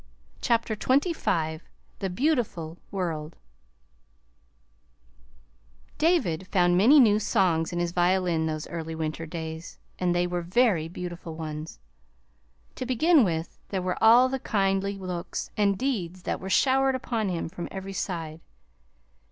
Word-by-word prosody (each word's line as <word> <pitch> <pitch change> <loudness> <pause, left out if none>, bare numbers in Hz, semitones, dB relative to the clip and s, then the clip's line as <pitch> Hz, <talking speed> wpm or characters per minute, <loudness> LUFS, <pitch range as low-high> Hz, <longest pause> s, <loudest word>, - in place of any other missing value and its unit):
CHAPTER 230 -2 +1
XXV 210 - 0 0.4
THE 195 - -2
BEAUTIFUL 185 - -1
WORLD 165 -5 -3 2.6
David 200 - +1
found 175 -2 +3
many 240 +11 +7
new 215 -5 +5
songs 175 -6 +1
in 175 - -4
his 175 -1 0
violin 175 -2 +1
those 155 -1 -4
early 165 -1 -5
winter 160 +1 -4
days, 160 0 -7 0.2
and 175 -1 +1
they 175 0 +2
were 175 0 -2
very 180 -2 +2
beautiful 175 -1 -7
ones. 155 0 -6 1.0
To 255 - -3
begin 290 +4 +4
with, 165 -4 -2
there 190 -2 -2
were 180 +3 -2
all 235 +3 +7
the 265 +1 -3
kindly 195 -2 0
looks 180 -3 -5
and 200 -2 +2
deeds 185 -9 -2
that - - -2
were 190 - -6
showered 265 +4 +3
upon 230 -5 -2
him 175 -2 -2
from 170 +1 -6
every 195 0 -6
side. 165 -4 -4
180 Hz, 130 wpm, -27 LUFS, 165-220 Hz, 2.6 s, many